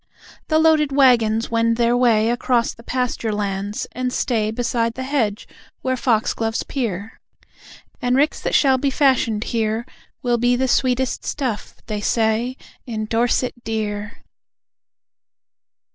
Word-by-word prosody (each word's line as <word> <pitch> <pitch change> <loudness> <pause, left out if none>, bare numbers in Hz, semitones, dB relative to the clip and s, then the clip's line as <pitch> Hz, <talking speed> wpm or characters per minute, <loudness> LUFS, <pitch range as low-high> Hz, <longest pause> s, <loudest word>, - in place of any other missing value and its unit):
The 310 - +2
loaded 315 -2 +4
waggons 235 -5 +3
wend 230 0 +2
their 240 0 +3
way 230 -2 +3
Across 240 -1 +1
the - - -15
pasture 245 -2 -2
lands, 205 0 -3
and 250 +1 -2
stay 225 -4 0
Beside 230 0 -1
the 260 - -4
hedge 245 -7 -1 0.4
where 260 0 0
foxgloves 225 -2 0
peer; 220 -6 -4 0.8
And 245 0 +1
ricks 290 +3 +1
that - - -1
shall 265 -2 +4
be 280 - +1
fashioned 260 -6 +2
here 225 0 -1 0.4
Will 240 -1 +1
be 245 +1 +3
the 260 +1 0
sweetest 255 0 +1
stuff, 250 -7 -3
they 210 -2 -4
say, 230 +4 0 0.3
In 220 -2 -3
Dorset 240 +2 0
Dear! 210 -1 -4
235 Hz, 130 wpm, -21 LUFS, 220-255 Hz, 0.8 s, loaded